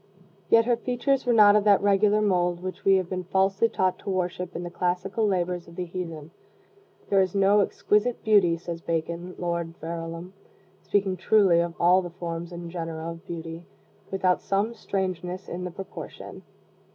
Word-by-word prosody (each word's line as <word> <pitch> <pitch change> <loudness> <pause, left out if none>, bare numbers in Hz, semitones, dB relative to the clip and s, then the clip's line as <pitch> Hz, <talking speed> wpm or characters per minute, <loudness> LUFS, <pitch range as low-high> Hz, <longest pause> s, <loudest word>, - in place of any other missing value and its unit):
Yet 230 0 +5
her 240 -1 +2
features 250 +2 -1
were - - +4
not 210 -3 +7
of 210 - +4
that 205 -2 +6
regular 205 +1 +3
mold 180 -3 +1
which 185 0 -6
we 195 - +5
have 185 -2 0
been 185 0 -4
falsely 195 +4 +2
taught 185 -3 0
to - - -7
worship 180 -1 -2
in 175 - -4
the 175 - -6
classical 185 +5 -1
labors 180 -2 -1
of 170 - -13
the 180 - -3
heathen. 165 -3 -6 0.8
"There 195 -1 +5
is 185 0 -1
no 200 +1 +4
exquisite 210 +3 +1
beauty," 200 -6 +4
says 170 0 -6
Bacon, 170 +2 -3
Lord 170 -1 -3
Verulam, 165 +2 -6 0.5
speaking 195 0 0
truly 190 -2 +4
of 170 0 -1
all 180 +2 +5
the 175 - -6
forms 170 0 -6
and 170 -1 -7
genera 165 -1 -5
of 165 0 -11
beauty, 165 0 -7 0.4
"without 185 -1 +1
some 200 +4 0
strangeness 185 -3 -4
in 180 +1 -5
the - - -3
proportion." 195 +2 -9
180 Hz, 175 wpm, -26 LUFS, 170-200 Hz, 0.8 s, not